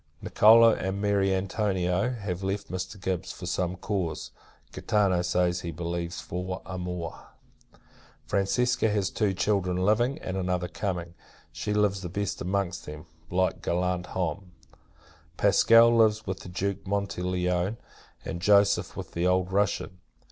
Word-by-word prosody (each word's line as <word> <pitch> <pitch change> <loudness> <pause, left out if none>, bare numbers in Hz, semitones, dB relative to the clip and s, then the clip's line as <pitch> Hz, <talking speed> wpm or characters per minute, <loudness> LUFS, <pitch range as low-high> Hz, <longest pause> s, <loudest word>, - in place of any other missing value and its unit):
Nicolo, 115 +1 +6
and 95 +1 -3
Mary 100 -1 +2
Antonio, 95 0 0
have 100 -6 -4
left 95 -1 -3
Mr. 95 +2 -5
Gibbs, 95 -1 -3
for - - -9
some 90 0 -1
cause; 90 -4 -3 0.4
Gaetano 100 -4 +1
says, 90 0 +1
he 85 - -5
believes, 85 +1 -4
for 90 +1 -5
amore. 90 -3 -6 1.0
Francesca 115 +4 +1
has 105 -2 0
two 105 -3 +1
children 95 -2 0
living, 110 +9 +2
and 95 -11 -5
another 90 -1 -1
coming. 90 -3 -4 0.4
She 85 +6 -4
lives 105 -2 +1
the 90 - -5
best 100 +2 -3
amongst 95 0 -2
them, 75 +1 -8 0.2
like 95 +1 0
gallant 90 +1 -1
homme. 90 +1 -4 0.8
Pasqual 115 +1 +6
lives 110 -1 +3
with 95 -1 -4
the - - -10
Duke 100 +2 -3
Montelione; 90 0 -1 0.5
and 85 - -5
Joseph, 100 +1 +3
with - - -6
the 85 +1 0
old 90 0 +1
Russian. 95 -2 0
95 Hz, 135 wpm, -27 LUFS, 90-100 Hz, 1.0 s, Nicolo